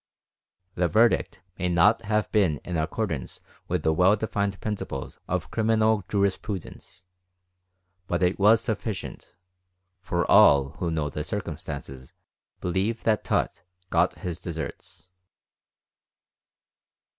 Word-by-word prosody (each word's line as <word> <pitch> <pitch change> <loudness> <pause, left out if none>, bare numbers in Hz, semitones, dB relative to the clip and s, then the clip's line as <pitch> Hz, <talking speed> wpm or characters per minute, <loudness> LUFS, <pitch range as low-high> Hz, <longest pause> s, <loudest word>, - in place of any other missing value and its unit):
The 90 -1 +1
verdict 110 +6 +2 0.2
may 90 - 0
not 105 +6 +4
have 105 -1 0
been 95 -9 +2
in 90 - -4
accordance 80 - -3 0.3
with 90 -3 -1
the 80 - +3
well 90 +5 +4
defined 100 -2 -2
principles 105 -2 -5
of - - -2
criminal 110 -2 +2
jurisprudence, 100 -3 -3 1.0
but 85 +1 0
it 90 +2 +1
was 110 +3 +5
sufficient, 105 -1 -5 0.7
for 85 -1 -1
all 70 -1 +6
who 85 - -1
know 80 -3 -2
the - - -4
circumstances 65 -1 -6 0.5
believe 95 +6 -1
that 110 -2 +1
Tutt - - -1 0.3
got - - +2
his 85 -2 -5
deserts. 80 +2 -7
95 Hz, 110 wpm, -26 LUFS, 85-110 Hz, 1.0 s, all